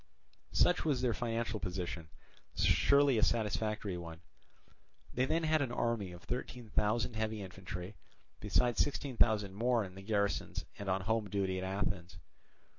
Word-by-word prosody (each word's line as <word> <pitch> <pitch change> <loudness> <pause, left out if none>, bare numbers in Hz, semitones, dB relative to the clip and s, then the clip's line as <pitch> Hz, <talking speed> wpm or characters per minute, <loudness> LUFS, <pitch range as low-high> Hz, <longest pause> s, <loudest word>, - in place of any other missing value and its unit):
Such 180 - +4
was 140 -5 +1
their 120 -2 +3
financial 115 -2 -2
position—surely 95 - +1
a - - +2
satisfactory 105 -4 0
one. 85 -1 -8 0.9
Then 130 +2 +1
they 165 0 +2
had 155 -1 +3
an 130 -4 -1
army 115 -6 -1
of 90 0 -11
thirteen 125 -2 -5
thousand 110 +3 +1
heavy 110 -1 -2
infantry, 95 0 -7 0.5
besides 120 +3 +2
sixteen 140 -2 -4
thousand 105 -4 +3
more 120 +2 +2
in 95 - -10
the 95 - -10
garrisons 100 0 -1
and 100 -1 -3
on 95 +1 +1
home 110 +1 0
duty 95 -1 0
at - - -4
Athens. 95 -2 -2
105 Hz, 145 wpm, -34 LUFS, 95-120 Hz, 0.9 s, Such